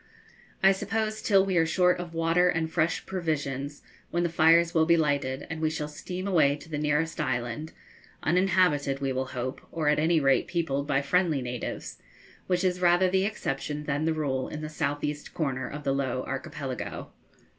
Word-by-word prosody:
I 195 - +8
suppose 215 +2 -2
till 195 -2 +4
we 190 -2 0
are 165 - +4
short 180 +2 +3
of 175 -1 -6
water 165 +2 +3
and 160 -1 -1
fresh 165 0 0
provisions, 145 -6 -3 0.3
when 175 0 0
the 170 - +1
fires 165 +1 +5
will 160 -1 +3
be 170 0 +5
lighted 145 -3 0
and 160 0 -5
we 155 - +2
shall 155 -1 -3
steam 180 +5 -6
away 155 -7 +4
to 150 - -13
the 150 -2 -3
nearest 150 +2 0
island 120 +4 -2 0.5
uninhabited, 175 -6 +2
we 135 -1 -1
will 130 0 -2
hope, 130 +1 -4
or 155 -3 0
at 150 - +3
any 160 +1 +3
rate 135 -2 +3
peopled 145 -5 -1
by 140 -1 +1
friendly 155 -2 +1
natives, 125 -1 -5 0.5
which 180 0 +1
is 180 -1 0
rather 180 +1 +4
the 190 0 +2
exception 150 -7 -3
than 145 +1 -1
the 160 - +2
rule 135 -4 -1
in 150 - -6
the 155 - -5
south 145 -2 -2
east 150 0 -4
corner 130 -5 -2
of 150 +1 -7
the 135 - +1
Low 130 -2 -1
Archipelago. 135 -1 -5
155 Hz, 190 wpm, -27 LUFS, 140-175 Hz, 0.5 s, I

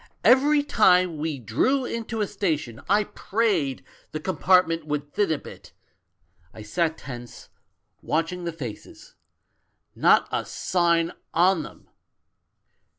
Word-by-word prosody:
Every 285 +3 +5
time 180 - +3
we 155 -1 -2
drew 135 - 0
into 230 -2 -4
a 205 - 0
station 160 - -2
I 205 +2 +4
prayed 200 - -1 0.3
the 155 - -3
com 180 +1 -4
partment 165 -3 +3
would 145 -1 -4
thin 205 -3 +1
a 155 - +1
bit; - - -13 0.8
I 110 - -9
sat 160 +8 -1
tense, 120 -2 -10 0.5
watching 165 +3 -2
the 170 - -3
faces. 130 -10 -9 0.8
Not - - +4
a - - -1
sign 170 -2 +1 0.2
on 175 +1 +4
them! - - -12
170 Hz, 125 wpm, -25 LUFS, 150-200 Hz, 0.8 s, Every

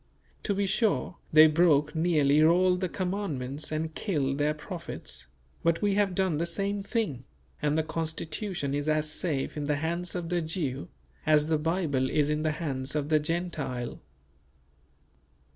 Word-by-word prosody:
To 200 - -1
be 200 +1 +1
sure, 200 -3 0
they 155 0 +9
broke 150 -2 +4
nearly 155 -3 +3
all 180 +3 +5
the 180 0 -2
Commandments 155 -9 -3
and 155 +1 -2
killed 145 -9 -1
their 150 +1 +1
prophets; 165 - -5 0.3
but 170 +3 +1
we 205 -1 +3
have 200 -2 +1
done 185 -5 +1
the 170 - 0
same 200 +3 -2
thing; 195 - -2 0.4
and 150 0 +1
the 160 - +2
Constitution 160 0 -3
is 145 +1 -1
as 155 0 +1
safe 150 -6 -1
in 150 -1 -3
the 145 0 +1
hands 170 +4 -2
of 175 -2 -3
the 175 -1 +1
Jew, 155 - -3 0.4
as 150 0 +4
the 155 -2 +2
Bible 150 -5 0
is 150 -1 +2
in 150 0 0
the 155 -1 0
hands 140 -3 -3
of 150 -1 -1
the 155 -1 +4
Gentile. 150 -6 -3
160 Hz, 160 wpm, -28 LUFS, 150-180 Hz, 0.4 s, they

